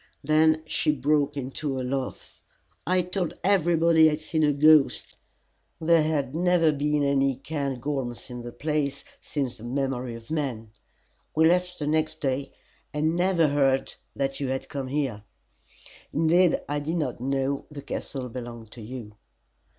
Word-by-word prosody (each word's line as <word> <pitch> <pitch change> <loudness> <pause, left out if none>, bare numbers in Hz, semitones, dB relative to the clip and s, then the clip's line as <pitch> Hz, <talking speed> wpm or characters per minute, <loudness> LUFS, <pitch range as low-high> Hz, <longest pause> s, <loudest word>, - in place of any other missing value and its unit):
Then 155 +1 +3
she 155 0 +1
broke 145 +1 +1
into 135 +1 -3
a - - -2
laugh. 130 0 -4 0.5
"I 185 0 +3
told 180 -2 -3
everybody 170 -4 +4
I 155 - +2
had 150 - -3
seen 155 +1 -1
a 150 -1 +4
ghost; 150 0 +4 0.6
there 165 0 +4
had 145 -4 0
never 175 -1 +3
been 150 0 0
any 135 -1 +2
Cairngorms 135 -3 -4
in 125 0 -6
the 120 0 -7
place 145 +1 -2 0.2
since 135 -5 -3
the 110 - -13
memory 125 -1 -2
of 115 +4 -12
man. 125 -8 -3 0.6
We 160 +1 +5
left 180 +1 +2
the 150 - -3
next 155 +1 0
day, 135 -1 -2 0.4
and 155 +2 0
never 175 -3 +3
heard 135 -2 +2 0.2
that 135 0 -2
you 140 - -2
had 130 0 -3
come 135 -2 -4
there; 135 -8 -1 0.9
indeed, 165 +3 +3
I 145 +1 -1
did 155 +4 -3
not 140 -8 -2
know 135 +1 -1
the 145 -2 -9
castle 135 -2 -4
belonged 120 -2 -8
to 115 - -11
you." 115 -1 -8
145 Hz, 155 wpm, -26 LUFS, 135-160 Hz, 0.9 s, We